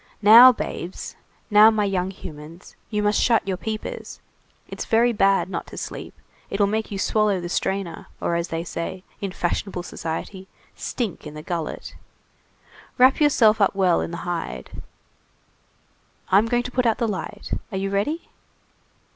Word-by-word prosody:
Now, 235 +5 +10
babes, 185 -6 -6 0.4
now, 210 +1 +8
my 215 -2 +1
young 190 -2 -1
humans, 165 -2 -11
you 210 -1 -1
must 205 0 +2
shut 230 -4 +2
your 190 - 0
peepers. 215 +4 -6 0.5
It's - - -6
very 235 +2 +3
bad 195 -3 +3
not 190 - -5
to - - -11
sleep. - - -7 0.3
It'll 200 +1 +2
make 215 +2 -1
you 200 - -4
swallow 210 0 +1
the 175 0 -5
strainer, 190 -1 -2
or, - - -1
as 170 0 -1
they 165 0 -3
say, 170 +2 -5 0.2
in 200 -2 -3
fashionable 180 +1 -2
society, 175 +4 -6 0.3
stink 230 -9 -4
in 150 - -10
the 150 - -8
gullet. 170 -2 -5 1.0
Wrap 260 +4 +5
yourself 225 -7 +4
up 200 - +3
well 185 -3 +3
in - - -3
the 170 +1 -7
hide! 175 -2 -5 1.5
I'm 200 +4 +4
going 240 +1 +1
to 250 - -6
put 250 -1 +1
out 225 - +2
the 230 - 0
light. 205 -3 -5 0.2
Are 190 - -3
you 195 +1 -2
ready?" 250 +12 -1
195 Hz, 160 wpm, -23 LUFS, 180-220 Hz, 1.5 s, Now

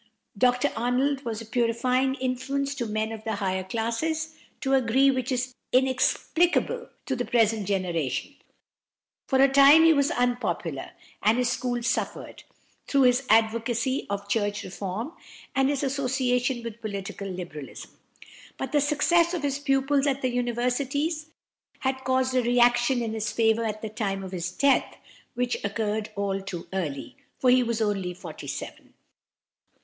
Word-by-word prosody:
Dr 250 +6 +2
Arnold 260 +4 0
was 225 -1 -3
a - - -8
purifying 250 +3 +1
influence 270 +2 -2
to 245 -4 -3
men 215 +1 -2
of 220 -1 -7
the 220 -1 -2
higher 190 -2 -1
classes, 270 +11 -2 0.3
to 270 -1 0
a 265 - +5
degree 265 +3 +4
which 260 -1 -2
is 255 0 -1 0.2
inexplicable 320 - +1 0.2
to 265 - -1
the 245 - -1
present 225 -4 +1
generation. 180 - -1 0.9
For 265 - +2
a 275 - +7
time 280 +3 +7
he 325 0 +7
was 280 -1 +2
unpopular, 245 0 -2 0.3
and 220 +3 +3
his 250 -1 +1
school 245 -2 -2
suffered, - - -3 0.4
through 275 -1 +3
his 250 +1 +3
advocacy 230 +3 +2
of 200 0 -3
church 205 -1 -1
reform 200 - -5 0.4
and 270 0 +3
his 285 -1 -1
association 255 -2 0
with 230 0 -7
political 200 -1 -5
Liberalism; 175 -6 -8 0.7
but 265 - -4
the 295 0 +3
success 335 +4 +3
of 325 - -4
his 280 -1 -1
pupils 275 0 +2
at 275 -1 -1
the 255 - +2
universities 255 +6 -1 0.5
had 265 -1 -1
caused 260 0 +1
a 255 - +3
reaction 240 +1 +3
in 225 -1 -3
his 220 -1 -2
favour 225 +1 +2
at 215 0 -4
the - - -2
time 195 -3 -3
of 190 - -7
his 175 -1 -3
death, 280 +8 +2 0.4
which 245 0 -1
occurred 210 +1 -2
all 200 -1 -1
too 180 -3 -7
early, 170 - -4 0.2
for 255 - +3
he 255 0 +5
was 230 -2 0
only 195 -4 -1
forty 180 - -9
seven. - - -7
245 Hz, 155 wpm, -26 LUFS, 215-270 Hz, 0.9 s, a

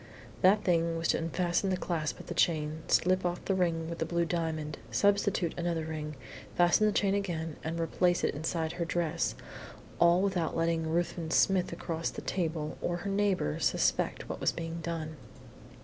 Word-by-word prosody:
That 200 +3 +5
thing 170 -2 +2
was 165 - -1
to - - +3
unfasten 175 +3 0
the 185 - +1
clasp 165 -4 -2
of - - -9
the - - -5
chain, 155 -1 +1
slip 185 +1 +3
off 175 0 -2
the 195 - +1
ring 170 -3 0
with 170 0 -5
the 160 - 0
blue 170 0 +1
diamond, 160 -3 -2
substitute 200 - +2
another 170 -2 -1
ring, 155 -1 -5 0.4
fasten 175 +5 +4
the - - +3
chain 200 -1 +2
again 165 -6 -2
and 165 +1 -3
replace 175 +2 +1
it - - +1
inside 160 +2 -2
her 170 - -3
dress, 170 -1 -1 0.6
all 170 +2 +5
without 180 -6 0
letting 165 -1 +1
Ruthven 170 0 -1
Smith 185 +2 +3
across 165 -1 -3
the - - -8
table, 160 -4 -2
or 175 - -1
her 200 - -1
neighbours, 195 - +1
suspect - - +1
what - - -5
was - - +3
being 165 0 -5
done. 160 -1 -4
170 Hz, 180 wpm, -30 LUFS, 160-180 Hz, 0.6 s, That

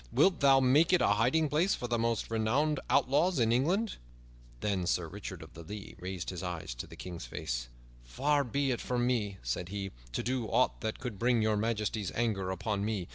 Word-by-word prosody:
Wilt 185 -4 +4
thou 135 -1 +6
make 140 +7 +4
it 180 - +5
a - - +4
hiding 125 +10 +3
place 165 +7 +2
for 125 - -4
the 120 -1 0
most 115 -1 -1
renowned 130 +7 +1
outlaws 145 +7 +3
in 115 -2 +3
England?" 180 - +1 0.6
Then 95 -4 0
Sir 85 -1 +1
Richard 95 -2 -7
of 80 - -14
the 85 - -10
Lea 100 +5 -8
raised 90 -1 -4
his 90 - -6
eyes 90 -7 -4
to - - -7
the - - -11
King's 90 -2 -7
face. - - -4 0.4
"Far 140 - +1
be 140 +2 0
it 120 - -2
from 120 -1 0
me," 105 -6 0
said 75 +9 -3
he, 100 -1 -4 0.2
"to - - -1
do 125 -2 -1
aught 125 +4 +1
that 110 -1 -2
could 120 -7 -6
bring 120 -1 +3
Your 110 0 +2
Majesty's 105 -2 -1
anger 105 -6 0
upon 100 +1 -2
me. 105 -4 -2
115 Hz, 205 wpm, -31 LUFS, 95-130 Hz, 0.6 s, thou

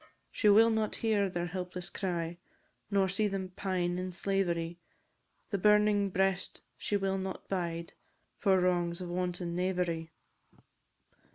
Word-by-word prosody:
She 210 - +3
will 225 +3 +7
not 220 -1 0
hear 210 -3 +1
their 175 -1 -2
helpless 180 0 -5
cry, 175 -3 -3 0.5
Nor 200 -2 +3
see 200 +3 +1
them 195 -2 -3
pine 180 -2 -1
in 185 0 -3
slavery! 175 -2 -1 0.7
The 200 - 0
burning 210 0 +4
breast 190 0 0
she 205 - -1
will 195 -1 0
not 190 0 -5
bide, 170 -3 -3 0.5
For 190 -3 +4
wrongs 175 -1 +1
of 180 -1 -5
wanton 175 -1 -2
knavery. 175 -3 -1
185 Hz, 130 wpm, -31 LUFS, 175-195 Hz, 0.7 s, will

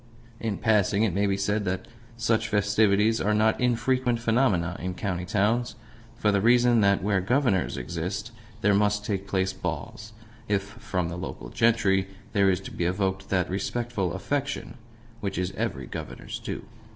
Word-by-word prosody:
In 110 -3 -2
passing, 105 -2 +2
it 105 -6 +1
may 100 +2 +2
be 100 0 +1
said 105 +2 0
that 95 0 -2 0.3
such 115 -1 +1
festivities 105 +1 +3
are 105 +2 +2
not 110 +3 +2
infrequent 125 0 +1
phenomena 110 -8 +2
in 90 +2 -4
county 90 -3 -3
towns, 105 +6 +1 0.4
for 105 - +2
the 100 -1 +2
reason 120 +1 +5
that 100 -1 +3
where 100 -2 +2
Governors 115 -2 +1
exist 90 - -4 0.3
there 105 0 +4
must 105 +1 +2
take 100 -2 -2
place 95 -1 0
balls 105 +3 -5 0.3
if 100 -1 +1
from 100 -4 -3
the 85 - -5
local 90 - -6
gentry 105 -5 +2 0.3
there 100 -3 +4
is 90 -2 +2
to - - -8
be 85 - -2
evoked 95 +1 -1
that 90 -2 +1
respectful 100 0 -2
affection 140 +7 -2 0.5
which 100 -5 -3
is 90 0 -1
every 65 0 -3
Governor's - - -7
due. - - -5
100 Hz, 165 wpm, -26 LUFS, 95-115 Hz, 0.5 s, reason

